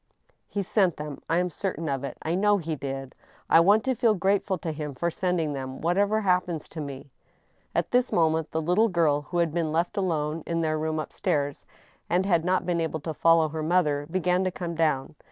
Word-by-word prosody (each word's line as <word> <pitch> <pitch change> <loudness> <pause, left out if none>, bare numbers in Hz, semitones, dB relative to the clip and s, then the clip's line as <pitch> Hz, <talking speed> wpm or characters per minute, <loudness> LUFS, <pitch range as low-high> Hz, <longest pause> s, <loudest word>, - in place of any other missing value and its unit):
" - - -37
He 200 - -2
sent 185 -3 +2
them 150 -2 -6
— - - -47
I 165 - +2
am 180 0 0
certain 165 -1 -3
of 135 -2 -2
it* 140 - -5
I 160 - -1
know 205 +3 +3
he 165 -3 -3
did. 135 -2 -5 0.4
I 165 - +8
want 205 +6 +5
to 260 0 +1
feel 225 -2 +2
grateful 195 0 +1
to 160 -1 -4
him 150 -2 -5
for 170 +6 -1
sending 170 -4 -1
them, 130 -1 -5
whatever 200 +6 +1
happens 180 -5 0
to 160 - -6
me." 140 -1 -8 0.6
At - - 0
this 250 0 +2
moment 160 -1 +2
the 160 0 -2
little 180 +8 +3
giri, 160 -5 +2
who 175 - -3
had 170 -3 +1
been 165 -2 0
left 170 +6 -1
alone 160 -4 -1
in 170 -1 0
their 155 -1 0
rooms 155 0 -1
up - - -9
stairs, 145 -6 -1 0.4
and 180 +2 +2
had 170 -4 +2
not 185 +1 +1
been 170 -1 0
able 160 -1 -2
to 160 +1 -4
follow 165 0 +4
her 160 +1 -4
mother, 155 -3 +1
began 180 +1 +1
to 185 - +1
come 175 -1 -5
down. 155 -3 0
165 Hz, 225 wpm, -26 LUFS, 155-185 Hz, 0.6 s, I